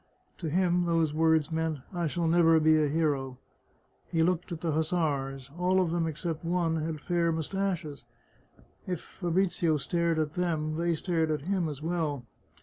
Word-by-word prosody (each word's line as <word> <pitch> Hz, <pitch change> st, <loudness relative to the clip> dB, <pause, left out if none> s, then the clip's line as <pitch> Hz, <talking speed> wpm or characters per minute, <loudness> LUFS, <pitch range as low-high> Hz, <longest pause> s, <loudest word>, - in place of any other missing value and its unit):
To 165 Hz, -, -3 dB
him 175 Hz, +1 st, +2 dB
those 165 Hz, -3 st, +1 dB
words 160 Hz, 0 st, +2 dB
meant, 160 Hz, -1 st, -1 dB
" -, -, -21 dB
I 175 Hz, -2 st, -1 dB
shall 170 Hz, +3 st, -1 dB
never 165 Hz, -1 st, +5 dB
be 155 Hz, 0 st, +5 dB
a 150 Hz, -, +2 dB
hero! 140 Hz, -4 st, 0 dB, 0.4 s
" -, -, -38 dB
He 165 Hz, -1 st, +2 dB
looked 180 Hz, +1 st, 0 dB
at 165 Hz, -, -5 dB
the 165 Hz, -, 0 dB
hussars. 145 Hz, -4 st, -1 dB
All 185 Hz, +1 st, +3 dB
of 180 Hz, -3 st, +1 dB
them 170 Hz, -1 st, 0 dB
except 160 Hz, +1 st, -4 dB
one 170 Hz, -1 st, 0 dB
had 155 Hz, 0 st, -3 dB
fair 170 Hz, +1 st, +1 dB
mustaches. 160 Hz, -4 st, -3 dB, 0.8 s
If 180 Hz, -3 st, -2 dB
Fabrizio 175 Hz, -3 st, 0 dB
stared 170 Hz, +2 st, 0 dB
at 155 Hz, -1 st, 0 dB
them, 155 Hz, -2 st, -1 dB
they 170 Hz, 0 st, +1 dB
stared 165 Hz, -1 st, 0 dB
at 155 Hz, -2 st, -1 dB
him 180 Hz, -2 st, 0 dB
as 150 Hz, 0 st, -7 dB
well. 160 Hz, -6 st, -2 dB
165 Hz, 175 wpm, -29 LUFS, 155-175 Hz, 0.8 s, never